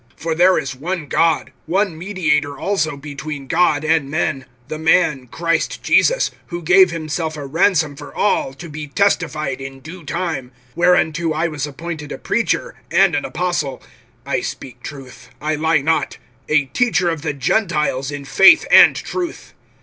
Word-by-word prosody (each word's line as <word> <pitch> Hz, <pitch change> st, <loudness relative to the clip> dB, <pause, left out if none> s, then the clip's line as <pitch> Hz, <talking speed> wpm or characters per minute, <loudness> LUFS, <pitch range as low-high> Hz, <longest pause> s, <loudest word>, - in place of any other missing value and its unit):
(5)For 160 Hz, -1 st, -2 dB
there 180 Hz, +2 st, +5 dB
is 135 Hz, -, -3 dB
one 165 Hz, +4 st, -4 dB
God, 165 Hz, +2 st, +1 dB, 0.2 s
one 190 Hz, +1 st, 0 dB
mediator 160 Hz, -5 st, -1 dB
also 155 Hz, -7 st, -1 dB
between 145 Hz, 0 st, -7 dB
God 160 Hz, -1 st, +2 dB
and 155 Hz, -3 st, +1 dB
men, 140 Hz, -3 st, -1 dB, 0.2 s
the 155 Hz, -, -5 dB
man 160 Hz, -5 st, +2 dB
Christ 165 Hz, +6 st, -2 dB
Jesus; -, -, +3 dB, 0.2 s
(6)who 175 Hz, -2 st, -5 dB
gave 185 Hz, +3 st, +6 dB
himself 160 Hz, -1 st, -4 dB
a 145 Hz, -, -6 dB
ransom 160 Hz, 0 st, +1 dB
for 145 Hz, 0 st, -10 dB
all, 205 Hz, -9 st, +1 dB
to 170 Hz, +5 st, -9 dB
be 150 Hz, -1 st, -7 dB
testified 155 Hz, -5 st, 0 dB
in 135 Hz, 0 st, -8 dB
due 165 Hz, +6 st, -11 dB
time; 145 Hz, -4 st, -4 dB, 0.2 s
(7)whereunto 170 Hz, -2 st, +2 dB
I 160 Hz, +2 st, 0 dB
was 150 Hz, -2 st, -4 dB
appointed 150 Hz, +1 st, -7 dB
a -, -, -5 dB
preacher, -, -, -1 dB, 0.2 s
and -, -, +4 dB
an -, -, -1 dB
apostle 165 Hz, -6 st, -2 dB, 0.5 s
(I 140 Hz, -, -1 dB
speak 120 Hz, -2 st, -7 dB
truth, 130 Hz, -3 st, -10 dB
I 155 Hz, +1 st, -1 dB
lie 160 Hz, 0 st, +1 dB
not), 160 Hz, +3 st, 0 dB, 0.3 s
a 150 Hz, -2 st, +3 dB
teacher 190 Hz, -, +1 dB
of 165 Hz, -3 st, -4 dB
the 150 Hz, -1 st, -2 dB
Gentiles 150 Hz, -, 0 dB
in 145 Hz, -1 st, -6 dB
faith 195 Hz, -, +6 dB
and -, -, +8 dB
truth. 355 Hz, -2 st, -5 dB
155 Hz, 160 wpm, -19 LUFS, 145-175 Hz, 0.5 s, and